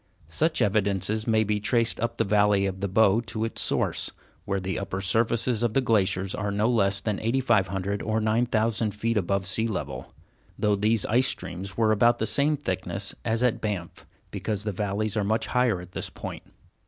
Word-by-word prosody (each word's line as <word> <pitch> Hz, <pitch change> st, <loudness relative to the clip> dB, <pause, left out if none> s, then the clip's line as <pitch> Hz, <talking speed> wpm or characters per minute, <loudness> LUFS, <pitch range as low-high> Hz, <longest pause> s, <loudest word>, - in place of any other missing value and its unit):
Such 155 Hz, -, +1 dB
evidences 100 Hz, +1 st, 0 dB
may 110 Hz, -1 st, +3 dB
be 105 Hz, 0 st, 0 dB
traced 115 Hz, +2 st, +1 dB
up 115 Hz, -, -2 dB
the -, -, +2 dB
valley 105 Hz, -1 st, +3 dB
of 95 Hz, -1 st, -3 dB
the 100 Hz, -, -1 dB
Bow 105 Hz, +2 st, +4 dB
to 110 Hz, +3 st, -2 dB
its 115 Hz, -, -3 dB
source, -, -, 0 dB, 0.4 s
where 100 Hz, -1 st, -1 dB
the 95 Hz, -1 st, -3 dB
upper 95 Hz, -1 st, -4 dB
surfaces 115 Hz, +4 st, +1 dB
of 120 Hz, -2 st, 0 dB
the -, -, +5 dB
glaciers 100 Hz, -6 st, +1 dB
were 105 Hz, 0 st, -2 dB
no 105 Hz, +2 st, +1 dB
less 100 Hz, -4 st, +2 dB
than 105 Hz, -1 st, -2 dB
8500 100 Hz, -5 st, 0 dB
or 110 Hz, 0 st, 0 dB
9000 110 Hz, -1 st, +1 dB
feet 115 Hz, +2 st, -1 dB
above 100 Hz, -1 st, 0 dB
sea 110 Hz, +4 st, +1 dB
level, 70 Hz, -, -5 dB, 0.5 s
though 105 Hz, -1 st, +2 dB
these 105 Hz, +2 st, +1 dB
ice 125 Hz, +4 st, +3 dB
streams 95 Hz, +3 st, -5 dB
were 110 Hz, -1 st, +3 dB
about 120 Hz, +3 st, +4 dB
the 110 Hz, -, -1 dB
same 140 Hz, +8 st, +2 dB
thickness 95 Hz, -4 st, -3 dB
as 115 Hz, +1 st, 0 dB
at 125 Hz, -3 st, +1 dB
Banff, 100 Hz, -6 st, -4 dB, 0.2 s
because 105 Hz, -2 st, -3 dB
the 105 Hz, -, -2 dB
valleys 105 Hz, +2 st, -2 dB
are 105 Hz, -, +1 dB
much 110 Hz, +3 st, 0 dB
higher 125 Hz, -6 st, +1 dB
at 90 Hz, 0 st, -11 dB
this -, -, -4 dB
point. -, -, -7 dB
105 Hz, 190 wpm, -26 LUFS, 95-115 Hz, 0.5 s, the